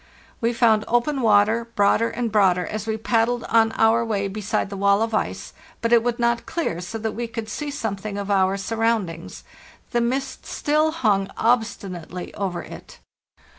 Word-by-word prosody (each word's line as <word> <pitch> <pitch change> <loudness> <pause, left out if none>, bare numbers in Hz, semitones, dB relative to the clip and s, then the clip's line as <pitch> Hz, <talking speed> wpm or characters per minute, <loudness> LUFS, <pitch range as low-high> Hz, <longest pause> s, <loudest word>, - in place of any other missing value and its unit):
"We 230 0 +2
found 225 -3 +3
open 260 +4 +1
water, 215 +1 +4
broader 210 +2 +3
and 235 -2 -3
broader, 185 -4 +3
as 215 0 -5
we 220 0 -1
paddled 230 +1 +1
on 225 -1 +3
our 225 +1 +3
way 205 -3 -1
beside 200 0 -2
the - - -4
wall 200 +2 +3
of 225 0 -3
ice; 215 - -2 0.3
but 230 +1 +1
it 235 - +6
would 240 0 -1
not 235 0 0
clear 315 - -2
so 200 +6 -5
that 220 0 -3
we 235 +2 -4
could 225 -1 -6
see 295 +7 -4
something 215 -7 -4
of 200 0 -3
our 190 0 +2
surround 225 -2 0
ings. 165 0 -10 0.5
The 240 - +1
mist 260 +3 -2
still 305 +1 +1
hung 210 -11 +1
obstinately 200 -7 -1
over 190 -3 -3
it. - - -11
225 Hz, 175 wpm, -23 LUFS, 200-235 Hz, 0.5 s, it